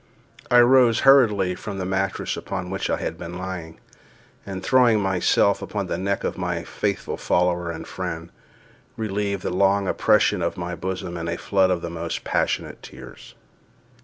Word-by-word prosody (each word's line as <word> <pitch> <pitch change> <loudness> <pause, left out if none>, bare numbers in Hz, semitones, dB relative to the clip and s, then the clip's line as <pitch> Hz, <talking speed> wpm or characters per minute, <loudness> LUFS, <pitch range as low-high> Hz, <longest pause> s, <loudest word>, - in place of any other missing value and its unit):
I 125 - +6
rose 120 -2 +5
hurriedly 105 -9 +5
from 100 +2 -7
the 95 - -3
mattress 95 +1 -1
upon 90 -2 -5
which 95 - -2
I - - +1
had 80 - -5
been 85 +1 -7
lying, 90 -3 -6 0.7
and, 95 -1 -6
throwing 125 -4 +4
myself 95 -3 +2
upon - - -3
the - - -3
neck 100 +1 -1
of - - -3
my - - -2
faithful - - -3
follower 90 -1 0
and 80 -1 -6
friend, 85 -2 -6 0.7
relieved 100 -3 -2
the - - -2
long 100 +1 +2
oppression 105 -2 +2
of 85 +3 -2
my 90 0 -4
bosom 90 -1 -4
in 85 0 -4
a 85 0 -2
flood 95 -2 +2
of 90 -2 -1
the 85 - -4
most 85 0 -4
passionate - - -1
tears. - - -12
95 Hz, 165 wpm, -23 LUFS, 90-100 Hz, 0.7 s, I